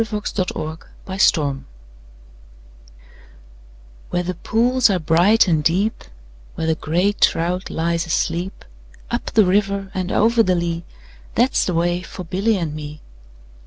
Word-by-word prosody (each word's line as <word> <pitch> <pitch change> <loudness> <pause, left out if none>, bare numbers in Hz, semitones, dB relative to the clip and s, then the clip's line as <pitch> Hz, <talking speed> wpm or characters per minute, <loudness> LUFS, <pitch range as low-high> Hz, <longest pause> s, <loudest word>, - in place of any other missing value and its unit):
A - - +3
Boy's 190 -3 -4
Song 140 -4 0 2.4
WHERE 175 - -1
the 185 +1 -3
pools 235 +7 +2
are 195 - +2
bright 175 +7 +4
and 160 -4 +2
deep, 195 +8 0 0.5
Where 160 - -3
the 160 - +2
grey 170 +6 0
trout 180 -2 0
lies 170 +1 -1
asleep, 170 +3 -2 0.5
Up 240 - -2
the 215 -3 +4
river 195 0 0
and 185 0 -3
over 230 +2 +3
the 185 -4 +2
lea, 170 -1 -2 0.5
That 245 +3 +2
's - - +3
the 180 - -1
way 175 +1 +1
for 185 0 -8
Billy 195 +6 0
and 165 -5 -3
me. 150 0 -8
180 Hz, 135 wpm, -20 LUFS, 165-205 Hz, 2.4 s, bright